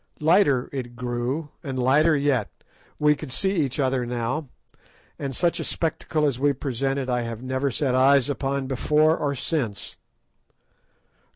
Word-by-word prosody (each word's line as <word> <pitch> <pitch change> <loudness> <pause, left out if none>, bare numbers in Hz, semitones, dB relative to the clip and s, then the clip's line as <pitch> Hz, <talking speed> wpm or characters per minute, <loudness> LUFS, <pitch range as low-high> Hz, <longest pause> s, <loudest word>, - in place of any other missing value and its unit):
Lighter 150 -5 +3
it 125 -3 -6
grew, 125 +5 -3
and 135 -3 -4
lighter 145 +6 +4
yet. 140 -7 +1 0.5
We 150 0 +3
could 150 -3 -8
see 190 +9 +2
each 150 -8 -1
other 130 -2 +1
now, 125 +4 -3 0.7
and 135 -2 -4
such 175 -1 +1
a - - -2
spectacle 155 -1 -1
as 135 -4 0
we 145 +1 +3
presented 135 0 -2
I 125 -1 0
have 115 0 -6
never 130 +2 -1
set 135 0 0
eyes 135 0 +4
on 140 -1 -2
before 150 +4 +2
or 140 -3 -2
since. 120 -8 -3
135 Hz, 150 wpm, -24 LUFS, 125-150 Hz, 0.7 s, lighter